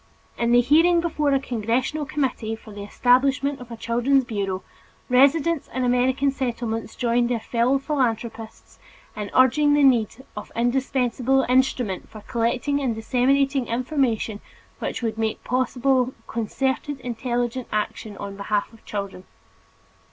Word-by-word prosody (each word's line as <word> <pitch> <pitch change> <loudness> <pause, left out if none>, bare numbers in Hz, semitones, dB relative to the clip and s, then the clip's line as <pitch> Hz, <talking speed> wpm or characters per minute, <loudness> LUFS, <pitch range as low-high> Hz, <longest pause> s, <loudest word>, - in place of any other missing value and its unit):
In 235 0 0
the 245 0 +6
hearing 330 +7 +4
before 305 -4 0
a 275 - +3
congressional 255 +5 -1
committee 250 -7 -2
for 220 -1 -14
the 205 - -8
establishment 265 +5 +2
of 245 - -10
a 230 - -7
Children's 245 +4 +2
Bureau, 200 -5 -3 0.5
residents 280 +5 +3
in 255 - 0
American 255 +3 +2
Settlements 235 -4 -3
joined 240 0 +1
their 240 -2 0
fellow 240 +4 +1
philanthropists 235 -6 -3 0.4
in 210 -1 -5
urging 290 +3 +5
the 290 - +3
need 255 -1 +2
of - - -6
this - - -16
indispensable 260 +1 +1
instrument 250 -6 +1
for 215 - -11
collecting 240 +6 -1
and 250 -5 0
disseminating 265 +3 +1
information 235 -4 -1 0.4
which - - -4
would 225 -1 -2
make 220 -1 -2
possible 255 0 +1
concerted 265 +5 -2
intelligent 245 +1 -2
action 210 0 -3
on 200 0 -6
behalf 205 +2 -2
of 225 - -18
children. 200 -2 -5
245 Hz, 135 wpm, -23 LUFS, 225-270 Hz, 0.5 s, the